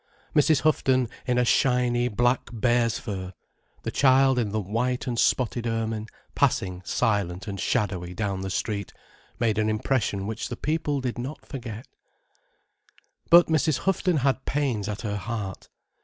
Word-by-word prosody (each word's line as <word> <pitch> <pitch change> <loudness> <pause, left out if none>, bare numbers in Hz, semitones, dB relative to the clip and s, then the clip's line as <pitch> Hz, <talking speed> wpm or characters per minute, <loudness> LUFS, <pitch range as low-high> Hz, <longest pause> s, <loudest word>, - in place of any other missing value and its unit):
Mrs. 150 -1 +4
Houghton 130 -5 +2 0.2
in 125 0 +3
shiny 125 -1 +2
black 120 +2 +1
bear's 120 0 +1
fur, 95 -2 -5 0.5
the - - -3
child 135 -1 +4
in 110 -4 0
the 110 +2 -1
white 115 +7 -1
and 120 -3 -2
spotted 120 -1 +1
ermine, 110 -1 -2 0.3
passing 90 -1 +1
silent 100 -2 -1
and 100 -1 -5
shadowy 90 -6 -1
down 100 -1 -2
the 95 - -4
street, 100 0 -3 0.5
made 110 -3 +1
an 110 0 +1
impression 110 -3 0
which 110 +1 -4
the - - -5
people 150 -2 -1
did 125 -2 -3
not 135 +5 -6
forget. 120 -4 -7 1.4
But 170 +1 +8
Mrs. 155 -2 +1
Houghton 185 -3 +2
had 135 -1 +1
pains 130 -8 -1
at 105 - -4
her 105 -3 -2
heart. 105 -2 -5
120 Hz, 145 wpm, -26 LUFS, 105-130 Hz, 1.4 s, But